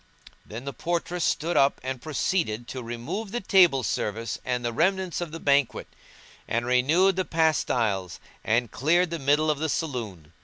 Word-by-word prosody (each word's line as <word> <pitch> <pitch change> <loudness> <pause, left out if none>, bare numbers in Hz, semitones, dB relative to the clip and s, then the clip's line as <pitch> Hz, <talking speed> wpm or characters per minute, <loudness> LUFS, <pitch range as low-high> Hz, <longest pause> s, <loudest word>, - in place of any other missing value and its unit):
Then 115 +5 -9
the 140 - -4
portress 175 +4 -2
stood 170 +2 0
up 135 0 +3
and 130 -1 -4
proceeded 145 - -1
to 130 - -5
remove 120 - -5
the 240 - -2
table 180 - +4
service 110 +1 -2
and 125 -1 -2
the 120 - -1
remnants 185 +4 0
of 170 -3 -4
the 165 - -7
banquet; 140 -4 +1 0.6
and 115 +1 -1
renewed 155 +10 +3
the 185 - +2
pastiles 120 - 0 0.2
and 115 +1 +1
cleared 170 +6 +2
the 170 - -3
middle 150 +3 +2
of 150 - -3
the 160 +1 -1
saloon. 110 - -4
140 Hz, 165 wpm, -26 LUFS, 120-170 Hz, 0.6 s, table